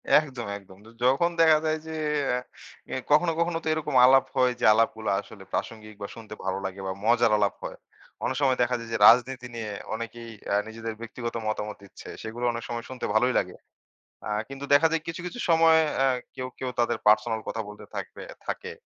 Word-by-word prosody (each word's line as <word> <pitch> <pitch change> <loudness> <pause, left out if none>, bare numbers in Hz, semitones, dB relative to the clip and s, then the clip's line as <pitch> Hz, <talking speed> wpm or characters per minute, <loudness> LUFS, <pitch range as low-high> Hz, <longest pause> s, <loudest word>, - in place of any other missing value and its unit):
একদম, 130 -7 +2
একদম। 95 -2 -16
য - - -15 0.2
যখন 135 +7 +4
দেখা 160 -1 +7
যায় 155 0 +1
যে 160 - -5 0.4
আ 125 +1 -8
কখনো, 165 +3 +5
কখনো 170 0 +1
তো - - -5
এরকম 155 -3 -3
আলাপ 135 +1 +6
হয় 130 -1 +4
যে, - - +1
আলাপগুলা 110 0 +1
আসলে 100 -1 -13
প্রাসঙ্গিক 110 -1 -4
বা 100 - -3
শুনতে 110 -2 -10
ভালো 95 0 -1
লাগে 95 0 -5
বা - - -1
মজার 120 0 +4
আলাপ 100 -2 +2
হয়। - - -6 0.5
অনেক - - 0
সময় 130 -2 +3
দেখা 120 +1 +2
যায় 115 0 -8
যে, - - +1
রাজনীতি 125 +1 +4
নিয়ে 115 -2 -4 0.2
অনেকেই 115 +1 -6 0.2
অ্যা 100 - +2
নিজেদের 115 0 -6
ব্যক্তিগত 115 0 -5
মতামত 105 0 -2
দিচ্ছে। 100 - -13
সেগুলো 115 +2 -4
অনেক 115 0 -5
সময় 120 -1 -4
শুনতে 130 -1 -5
ভালোই 125 +4 +3
লাগে। 90 - -4 0.7
আ - - -3 0.2
কিন্তু 135 +1 -7
দেখা 145 +3 +6
যায় 165 -1 0
কিছু, 165 +1 -4
কিছু 180 - -6
সময় 165 -1 +6 0.2
অ্যা 135 0 +3 0.3
কেউ, 130 0 -4
কেউ 130 - -3
তাদের 120 0 +1
পার্সোনাল 110 +1 +4
কথা 115 - -3
বলতে 105 0 -10
থাকবে - - -6 0.2
থাকে। 465 0 -4
120 Hz, 195 wpm, -26 LUFS, 110-135 Hz, 0.7 s, দেখা